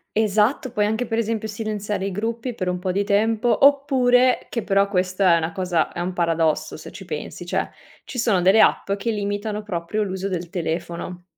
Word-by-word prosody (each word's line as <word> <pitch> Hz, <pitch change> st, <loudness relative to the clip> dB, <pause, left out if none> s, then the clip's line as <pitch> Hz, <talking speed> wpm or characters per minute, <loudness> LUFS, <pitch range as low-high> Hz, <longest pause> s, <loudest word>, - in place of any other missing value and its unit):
Esatto, 220 Hz, +4 st, +2 dB
puoi 210 Hz, -2 st, +1 dB
anche 220 Hz, +3 st, -1 dB
per 225 Hz, -1 st, -2 dB
esempio 225 Hz, -1 st, -1 dB
silenziare 210 Hz, -2 st, -3 dB
i 195 Hz, -, -2 dB
gruppi 230 Hz, +5 st, -3 dB
per 185 Hz, -5 st, -3 dB
un 180 Hz, -, -1 dB
po' 185 Hz, +1 st, -2 dB
di 200 Hz, +2 st, 0 dB
tempo, 220 Hz, +5 st, +2 dB
oppure 255 Hz, -3 st, +4 dB
che 230 Hz, -, -3 dB
però 200 Hz, -1 st, +2 dB
questa 185 Hz, -1 st, +2 dB
è -, -, +5 dB
una 165 Hz, 0 st, -2 dB
cosa, 180 Hz, -4 st, 0 dB
è 175 Hz, -, -5 dB
un 180 Hz, +1 st, -2 dB
paradosso 165 Hz, -3 st, 0 dB
se -, -, -10 dB
ci -, -, -10 dB
pensi, -, -, -6 dB
cioè -, -, -1 dB, 0.4 s
ci 250 Hz, -, -6 dB
sono 220 Hz, -5 st, +2 dB
delle 200 Hz, +4 st, +6 dB
app 195 Hz, -, +3 dB
che 200 Hz, +3 st, -3 dB
limitano 205 Hz, 0 st, -2 dB
proprio 200 Hz, +2 st, -2 dB
l'uso 190 Hz, 0 st, -3 dB
del 175 Hz, -2 st, -4 dB
telefono 175 Hz, 0 st, -4 dB
205 Hz, 195 wpm, -22 LUFS, 180-225 Hz, 0.4 s, delle